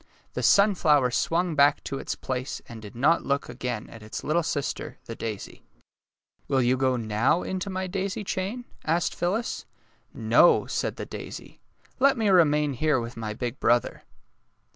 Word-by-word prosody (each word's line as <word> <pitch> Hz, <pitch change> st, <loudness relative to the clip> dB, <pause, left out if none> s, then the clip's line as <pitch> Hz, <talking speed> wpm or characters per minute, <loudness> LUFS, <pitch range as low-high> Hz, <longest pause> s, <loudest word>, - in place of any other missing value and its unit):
The -, -, -3 dB
sunflower 155 Hz, -10 st, +4 dB
swung 170 Hz, +6 st, +1 dB
back 145 Hz, 0 st, +4 dB
to 135 Hz, -, -4 dB
its -, -, -4 dB
place 130 Hz, 0 st, -4 dB
and 115 Hz, -2 st, -9 dB
did 105 Hz, 0 st, -11 dB
not 150 Hz, +8 st, +3 dB
look 140 Hz, 0 st, -1 dB
again 125 Hz, -2 st, -4 dB
at 115 Hz, -, -11 dB
its 105 Hz, 0 st, -7 dB
little 160 Hz, +3 st, +2 dB
sister, 145 Hz, -3 st, -3 dB
the -, -, -6 dB
daisy. 110 Hz, -3 st, -6 dB, 0.2 s
^' -, -, -35 dB, 0.7 s
Will 130 Hz, -1 st, +2 dB
you 125 Hz, +2 st, +3 dB
go 130 Hz, 0 st, +1 dB
now 115 Hz, +8 st, +1 dB
into 190 Hz, +1 st, -3 dB
my 190 Hz, 0 st, -2 dB
daisy 195 Hz, +2 st, -3 dB
chain? 200 Hz, +6 st, -3 dB
" -, -, -31 dB
asked 165 Hz, +2 st, +1 dB
Phyllis. 205 Hz, +7 st, -2 dB, 0.3 s
'' -, -, -40 dB, 0.2 s
No," -, -, +6 dB
said -, -, -2 dB
the -, -, -6 dB
daisy, -, -, -9 dB, 0.2 s
^* -, -, -25 dB
let 275 Hz, 0 st, +4 dB
me 220 Hz, -3 st, +2 dB
remain 150 Hz, -5 st, +4 dB
here 145 Hz, +1 st, +1 dB
with 115 Hz, 0 st, -6 dB
my 110 Hz, -2 st, -5 dB
big 125 Hz, +2 st, -4 dB
brother." 120 Hz, 0 st, +1 dB
145 Hz, 180 wpm, -26 LUFS, 125-180 Hz, 0.7 s, No